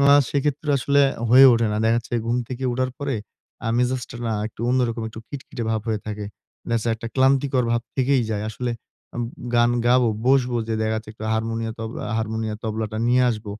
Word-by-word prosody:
মা 140 0 +7 0.2
সেক্ষেত্রে 145 +1 -1
আসলে 140 +2 +3 0.3
হয়ে 130 +3 +9
ওঠে 115 -1 +2
না। - - -1
দেখাচ্ছে 115 +2 0
ঘুম 120 +1 +1
থেকে 130 +1 -5
উঠার 130 +1 0
পরে 140 -2 -2 0.5
আ - - +1
মেজাজটা 125 0 -1
না 115 - 0
একটু 110 - -11
অন্যরকম 125 -2 +1
একটু 110 0 -9
খিটখিটে 135 -4 -7
ভাব 110 -1 0
হয়ে 110 -2 0
থাকে। 105 -1 -4 0.4
দেখাচ্ছে 115 0 0
একটা 115 +1 -7
ক্লান্তিকর 135 -1 +3
ভাব 120 - +2 0.2
থেকেই 130 -1 +3
যায়। 105 -1 -1
আসলে 120 +3 -3 0.4
আ - - -6
উ - - -1 0.3
গান 120 0 +4 0.2
গায়ো 125 -1 +4 0.2
বসবো 130 -2 +3
যে 110 - 0
দেখাচ্ছে 110 0 -2
একটু 110 0 -9
হারমোনিয় 115 0 -1
তব 110 0 -4 0.2
আ - - -2
হারমোনিয়াম, 110 0 -2
তবলাটা 110 -1 -3
নিয়ে 125 +1 +4
আসব। 110 -2 -5
120 Hz, 190 wpm, -23 LUFS, 110-130 Hz, 0.5 s, হয়ে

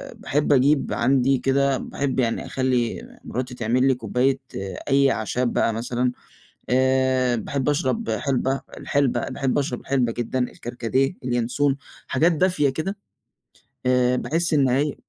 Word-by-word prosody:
باحب 145 +1 0
أجيب 140 +2 +3
عندي 130 +2 +2
كده 135 +1 +1
باحب 135 0 -3
يعني 115 -3 0
أخلّي 125 -3 -1 0.2
مراتي 125 0 -4
تعمل 125 +3 +1
لي 135 - +3
كوباية 125 +3 0 0.5
أي 140 0 +4
أعشاب 120 +3 -1
بقى 115 - +2
مثلًا. 120 +2 -1 0.6
آآ 130 -1 +2
باحب 130 +5 -2
أشرب 175 +10 0
حِلبة 135 -1 0 0.2
الحِلبة، 135 -4 0
باحب 135 -1 -1
أشرب 130 -3 -2
الحِلبة 125 -4 0
جدًا، 120 +2 -3
الكركديه، 125 +5 -1
الينسون، 125 +3 +1 0.3
حاجات 160 +7 +2
دافية 165 -3 +2
كده. 160 +9 -3 0.9
آآ 125 0 +3
باحِس 165 +5 0
إن 140 -3 +4
هي 140 +3 +1
130 Hz, 130 wpm, -23 LUFS, 125-140 Hz, 0.9 s, أي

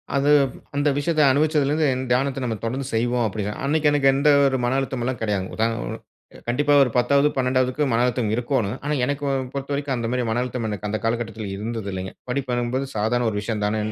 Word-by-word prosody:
அது, 140 +1 +2 0.5
அந்த 145 +1 +2
விஷயத்த 155 +1 +1
அனுபவிச்சலருந்து 150 +1 +2 0.2
தியானத்த 135 +2 +1
நம்ம 115 -3 -1
தொடர்ந்து 130 +4 -2
செய்வோம் 120 +1 +1
அப்டி. 105 0 -4 0.2
அன்னைக்கு 150 +1 +2
எனக்கு 140 -2 +3
எந்த 145 +2 +3 0.2
ஒரு 130 -1 +1
மன 125 +2 +1
அழுத்தம் 130 -2 -3
எல்லாம் 125 -2 -2
கெடையாதுங்க. 100 -4 -2
உதா, 110 +1 +2 0.2
ஒ, - - -5 0.6
கண்டிப்பா 145 +4 +2
ஒரு 125 - 0
10ஆவது, 140 +4 +4
12ஆவது 130 0 +2
க்கு 150 -2 +1
மன 115 - +2
அழுத்தம் 125 -3 0
இருக்கோணும். 120 -3 -1
ஆனா 150 - 0
எனக்கு 145 +1 -2 0.3
பொறுத்தவரைக்கும் 140 0 -2
அந்த 115 -1 -2
மாரி 125 -1 0
மன 120 - 0
அழுத்தம் 125 -3 -3
எனக்கு 105 0 -4
அந்த 110 - -2
காலகட்டத்தில 115 -2 -2
இருந்ததில்லைங்க. 100 -4 -4 0.2
படிப்பு 125 -2 -1
என்பது 130 +3 -2
சாதாரண 120 +3 +1
ஒரு 105 - -3
விஷயம் 105 -1 -3
தானேன் 110 +1 -1
125 Hz, 190 wpm, -23 LUFS, 115-140 Hz, 0.6 s, 10ஆவது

